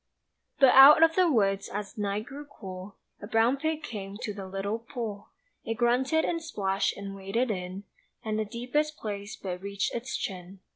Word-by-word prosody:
But 270 -2 +8
out 275 +5 +9
of 325 0 +5
the 365 -2 +4
woods 195 -5 +1
as 205 0 -5
night 205 0 -2
grew 290 +2 -9
cool 190 -7 -9 0.3
A 205 - -7
brown 230 +4 +3
pig 315 +2 -2
came 200 -6 -6
to 210 - -3
the 195 -2 -7
little 195 +3 -3
pool; 225 -4 -6 0.3
It 225 - -3
grunted 255 +7 +2
and 335 -1 -1
splashed 195 -11 -1
and 200 0 -6
waded 195 +5 -1
in 185 0 -5 0.4
And 215 0 -1
the 215 - 0
deepest 255 +7 -2
place 205 -1 -5
but 180 -2 -6
reached 200 0 -2
its 235 +2 -3
chin. 185 0 -6
215 Hz, 180 wpm, -28 LUFS, 195-260 Hz, 0.4 s, out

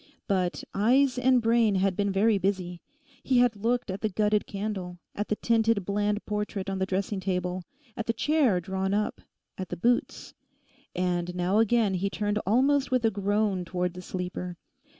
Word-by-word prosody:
But 185 -3 0
eyes 250 +5 +3
and 250 -1 +3
brain 230 -2 +3
had 190 0 +1
been 200 +1 0
very 205 +2 +3
busy. 180 -2 -2 0.4
He 260 - +1
had 245 -2 +4
looked 230 +1 -1
at 190 - -5
the 215 - 0
gutted 210 +1 +1
candle; 195 -3 -4 0.2
at 210 - -3
the 215 - 0
tinted 225 -3 +1
bland 205 +1 -1
portrait 210 -2 -3
on 190 - -3
the 190 - 0
dressing 195 +1 -1
table; 180 -1 -2 0.3
at 225 -2 -4
the - - +3
chair 265 - +2
drawn 190 +2 -2
up; 210 0 -1 0.4
at 185 - -4
the - - -4
boots; 240 +6 0 0.6
and 180 -1 -1
now 180 +4 +1
again 225 -2 +3
he 190 +2 0
turned 205 +1 -1
almost 270 +5 +3
with 255 -3 +1
a 225 - +3
groan 205 -1 0
towards 180 0 -2
the 180 - -8
sleeper. 180 -1 -5
205 Hz, 175 wpm, -27 LUFS, 185-225 Hz, 0.6 s, had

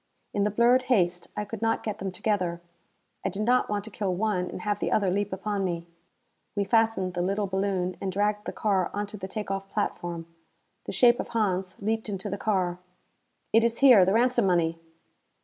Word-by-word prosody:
In 200 0 +1
the - - +2
blurred 235 +4 +4
haste, 175 -7 +2
I 210 - -1
could 210 +1 -7
not 225 0 +1
get 215 -1 -4
them 190 0 -3
together. 180 -3 -1 0.6
I - - 0
did 210 +1 -3
not 250 +3 +2
want 205 -1 -1
to 220 - -10
kill 190 -2 -2
one 185 -2 0
and - - -7
have 205 -1 -1
the - - -1
other 195 -4 +2
leap 205 +1 -1
upon 200 +1 -2
me. 170 -2 -2 0.7
We 205 - +1
fastened 225 -4 +2
the 175 - -1
little 200 +3 0
balloon 190 -1 -1
and 195 - -2
dragged 210 +2 0
the - - -3
car 195 -4 0
onto 205 0 -3
the 190 -2 -6
take 210 +1 -5
off 195 0 -4
platform. 175 -5 -3 0.6
The - - -4
shape 240 -1 +5
of - - -3
Hans 190 -5 -1
leaped 220 +2 -2
into 200 0 -4
the 200 - -3
car. 185 -4 0 0.7
"It 225 +1 +6
is 235 0 +1
here! 250 -8 +8
The 190 +2 +2
ransom 240 -2 +3
money!" 165 -2 +1
200 Hz, 200 wpm, -27 LUFS, 185-215 Hz, 0.7 s, here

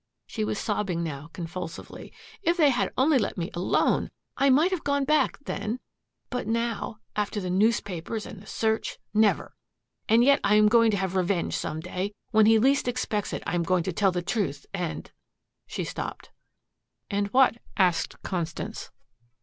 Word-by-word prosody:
She 220 - -3
was 210 - -1
sobbing 200 -6 -1
now 150 -1 -5
convulsively. 170 -1 -7 0.3
"If 350 -2 +1
they 300 -4 +5
had 245 - 0
only 270 +1 +4
let 210 - -2
me 175 +3 -3
alone! 175 +1 +1 0.3
I 275 - +3
might 305 +8 +4
have 370 -4 -2
gone 280 -1 +1
back, 305 +2 +2
then. 225 +4 -3 0.5
But 250 - -3
now 225 -2 -1 0.2
after 210 0 -1
the 185 -2 -3
newspapers 205 0 0
and 195 - -9
the 210 - -15
search 220 0 -1 0.2
never! 215 -1 +2 0.6
And 230 +2 +6
yet 280 +2 +5
I 200 +1 +4
am 210 0 +6
going 230 0 +5
to 205 - +1
have 190 0 -2
revenge 185 -1 0
some 155 - -3
day. 185 +4 -4 0.2
When 215 -2 +5
he 225 0 +6
least 270 +4 +3
expects 235 -4 -1
it - - -4
I - - -2
am 175 - +1
going 180 +1 +1
to 185 - -3
tell 195 +2 +3
the 175 -1 -2
truth 170 - -2
and 180 -4 -4 0.3
" - - -56
She - - -3
stopped. - - -6 0.8
"And 200 0 0
what?" 255 +2 +4 0.2
asked 180 -4 +1
Constance. 170 -4 -4
210 Hz, 175 wpm, -27 LUFS, 180-235 Hz, 0.8 s, And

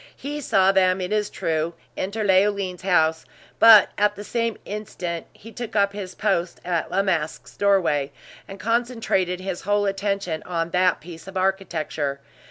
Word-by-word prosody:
He 295 +2 -5
saw 195 -7 +3
them, 185 -1 +3
it 180 +1 -3
is 210 -1 0
true, 160 +1 -2 0.2
enter 205 +3 -3
Leoline's 195 -2 +2
house, 160 -4 +2 0.4
but 220 -3 +9
at 210 0 +3
the 205 - -8
same 230 0 -2
instant, 180 -5 -5
he 225 - -14
took 240 -1 -7
up 200 -1 +3
his 190 -3 -7
post 190 -4 -1
at 175 -2 -1
La 195 - +1
Masque's 155 - -2
doorway, 175 -9 +2 0.4
and 195 - -9
concentrated 230 -6 0
his 185 -2 -4
whole 205 +1 +1
attention 195 -4 -2
on 170 -1 -3
that 180 +1 +2
piece 165 +1 -11
of 195 0 -6
architecture. 170 -7 -1
190 Hz, 160 wpm, -23 LUFS, 175-205 Hz, 0.4 s, but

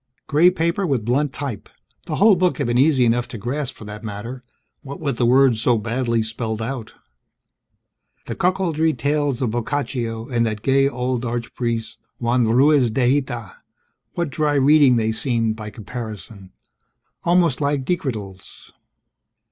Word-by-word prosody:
Gray 160 +4 +5
paper 180 +2 -1
with 130 -8 -1
blunt 135 +4 +1
type, 135 -6 -6 0.4
the - - -2
whole 205 0 +5
book 180 0 +1
had 140 - -1
been 120 0 0
easy 135 -3 +4
enough 120 +1 +1
to - - -7
grasp 130 +5 -3
for 110 - -11
that 105 +1 -9
matter 115 +4 -7 0.4
what 140 0 -8
with 145 -3 -2
the 120 - +2
words 130 -2 +4
so 120 0 +3
badly 115 +1 -1
spelled 110 0 -4
out. 115 0 -5 1.3
The - - -5
cuckoldry 170 -4 +1
tales 140 0 0
of 115 - 0
Boccaccio 120 -2 -3
and 120 -2 0
that 110 -2 -3
gay 135 +1 +3
old 125 -1 -2
archpriest, 115 -1 -3 0.2
Juan 120 0 +1
Ruiz 130 +3 +4
de 120 +2 +1
Hita, 120 -7 -3 0.6
what 170 -4 -2
dry 150 +1 0
reading 140 -1 +5
they 110 -1 +1
seemed 115 -1 -1
by 110 -1 -7
comparison 105 -2 -8 0.7
almost 170 -5 +2
like 140 -2 0
decretals. 110 - -5
125 Hz, 150 wpm, -21 LUFS, 115-145 Hz, 1.3 s, Gray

